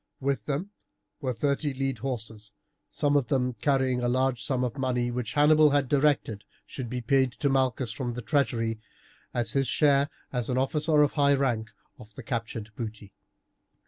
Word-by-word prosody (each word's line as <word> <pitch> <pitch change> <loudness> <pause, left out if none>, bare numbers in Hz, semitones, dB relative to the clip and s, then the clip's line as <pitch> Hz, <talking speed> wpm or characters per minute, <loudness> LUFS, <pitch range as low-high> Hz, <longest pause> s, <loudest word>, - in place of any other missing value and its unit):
With 140 0 -2
them 155 +8 -2 0.5
were 135 -4 -2
thirty 140 +3 -1
lead 135 -3 -2
horses, 110 -5 -5 0.4
some 145 0 +1
of 140 -4 +2
them 125 -1 0
carrying 130 -1 +1
a 120 - 0
large 130 0 +1
sum 130 -3 0
of 125 +2 -3
money, 125 -2 0
which 120 -3 -3
Hannibal 150 +1 +5
had 140 -1 +2
directed 135 -7 +1 0.2
should 125 -4 -6
be 125 0 -3
paid 130 +1 +2
to 140 - -1
Malchus 130 -3 +1
from 120 0 -4
the 125 - -6
treasury, 115 -4 0 0.5
as 120 -2 -1
his 135 -1 +1
share, 140 -1 +3 0.2
as 125 -1 -2
an 125 - 0
officer 150 +3 +2
of 145 - +1
high 140 -1 +4
rank, 120 -5 0 0.3
of 110 -3 -14
the - - -9
captured 115 -3 -4
booty. 110 -3 -7
130 Hz, 175 wpm, -27 LUFS, 120-140 Hz, 0.5 s, Hannibal